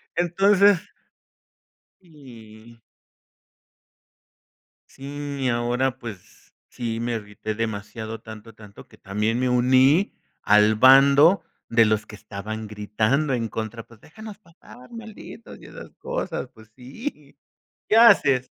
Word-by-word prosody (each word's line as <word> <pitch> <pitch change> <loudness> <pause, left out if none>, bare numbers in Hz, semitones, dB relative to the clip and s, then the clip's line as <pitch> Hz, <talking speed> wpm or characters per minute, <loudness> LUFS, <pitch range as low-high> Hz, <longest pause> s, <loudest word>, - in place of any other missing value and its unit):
Entonces 195 +2 +3 1.1
Sí. 115 - -16 2.1
Sí, 140 +1 -8
y 130 - +1
ahora, 120 +2 -1
pues, 110 -7 -12 0.2
sí 115 -2 -5
me 120 +1 -3
irrité 105 0 -6
demasiado, 110 0 -5
tanto, 110 0 -12
tanto, 105 -2 -15
que - - -20
también 105 +4 -2
me 130 0 0
uní 130 - +3 0.3
al 105 +1 +4
bando 140 - +6 0.3
de 115 -1 +4
los 110 0 0
que 105 - -12
estaban 110 +1 -8
gritando 110 +7 -1
en 115 -2 -2
contra: 110 +1 -6
"Pues 115 -2 -20
déjanos 215 +5 -12
pasar, 165 -9 -18
malditos", 230 0 -11
y - - -14
esas - - -12
cosas. - - -5
Pues 110 0 -18
sí. 140 - -9 0.5
¿Qué 215 - +3
haces? 140 - +5
120 Hz, 115 wpm, -23 LUFS, 110-145 Hz, 2.1 s, bando